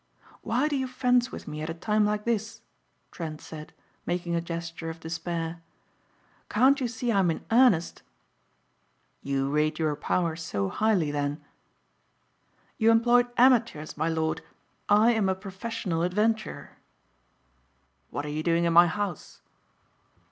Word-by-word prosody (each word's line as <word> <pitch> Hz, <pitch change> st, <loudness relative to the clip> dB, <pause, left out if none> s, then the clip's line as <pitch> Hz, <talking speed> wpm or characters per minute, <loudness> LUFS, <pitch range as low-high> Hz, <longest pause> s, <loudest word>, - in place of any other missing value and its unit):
"Why 250 Hz, +6 st, 0 dB
do 300 Hz, -, -1 dB
you 265 Hz, -1 st, -1 dB
fence 250 Hz, -1 st, +1 dB
with -, -, -9 dB
me 150 Hz, 0 st, -5 dB
at 155 Hz, -, -4 dB
a 165 Hz, -, -4 dB
time 210 Hz, +4 st, +1 dB
like 210 Hz, 0 st, -2 dB
this?" 225 Hz, -1 st, -2 dB, 0.5 s
Trent 155 Hz, -3 st, -6 dB
said 155 Hz, -1 st, -10 dB, 0.4 s
making 175 Hz, 0 st, -2 dB
a 170 Hz, -, +1 dB
gesture 165 Hz, -1 st, -5 dB
of 165 Hz, 0 st, -7 dB
despair. 165 Hz, 0 st, -4 dB, 0.9 s
"Can't 265 Hz, +5 st, +4 dB
you 250 Hz, -, +1 dB
see 245 Hz, 0 st, -2 dB
I 200 Hz, -, +3 dB
am 185 Hz, -3 st, +3 dB
in 165 Hz, -, -3 dB
earnest?" 230 Hz, -8 st, +3 dB, 1.2 s
"You 140 Hz, 0 st, -1 dB
rate 155 Hz, +1 st, +1 dB
your 155 Hz, -2 st, 0 dB
powers 165 Hz, +2 st, -1 dB
so 100 Hz, -11 st, -2 dB
highly 195 Hz, -, +1 dB
then?" 145 Hz, +1 st, -3 dB, 1.3 s
"You 225 Hz, 0 st, +4 dB
employed 240 Hz, +2 st, +4 dB
amateurs, 235 Hz, -, +3 dB
my 160 Hz, +2 st, 0 dB
lord, 160 Hz, 0 st, -1 dB, 0.5 s
I 215 Hz, +3 st, +5 dB
am 215 Hz, -4 st, +1 dB
a 190 Hz, -, +1 dB
professional 190 Hz, -2 st, -4 dB
adventurer." 210 Hz, +5 st, -1 dB, 1.3 s
"What 145 Hz, -, -4 dB
are -, -, -4 dB
you 150 Hz, +1 st, -2 dB
doing 170 Hz, +1 st, +1 dB
in 170 Hz, -1 st, +2 dB
my 175 Hz, +1 st, +8 dB
house?" 195 Hz, -1 st, -4 dB
175 Hz, 145 wpm, -27 LUFS, 160-225 Hz, 1.3 s, my